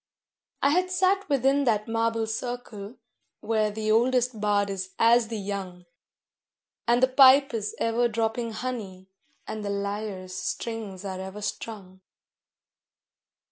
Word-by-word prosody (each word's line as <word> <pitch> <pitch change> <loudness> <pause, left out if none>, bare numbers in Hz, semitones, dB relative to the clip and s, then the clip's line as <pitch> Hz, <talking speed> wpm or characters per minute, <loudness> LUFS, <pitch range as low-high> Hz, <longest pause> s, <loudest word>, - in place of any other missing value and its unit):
I 280 - +5
had 365 +3 +2
sat 380 +1 +1
within 275 +1 +3
that 215 -3 +1
marble 225 0 0
circle 220 -1 -5 0.4
where 215 -1 +1
the 215 +1 -2
oldest 245 0 +2
bard 205 -1 +1
is 190 -1 -5
as 230 0 +5
the 225 0 -4
young, 195 -3 -5 1.0
And 240 +2 +3
the - - +7
pipe 265 +1 +6
is 215 -2 -3
ever 230 +1 +1
dropping 225 +1 -2
honey, 210 -6 -5 0.4
and 215 -1 -5
the 200 - -3
lyre's 200 -2 -4
strings 195 +2 -4
are 190 -1 -4
ever 190 +2 -7
strung. 195 -3 -6
220 Hz, 130 wpm, -26 LUFS, 200-245 Hz, 1.0 s, the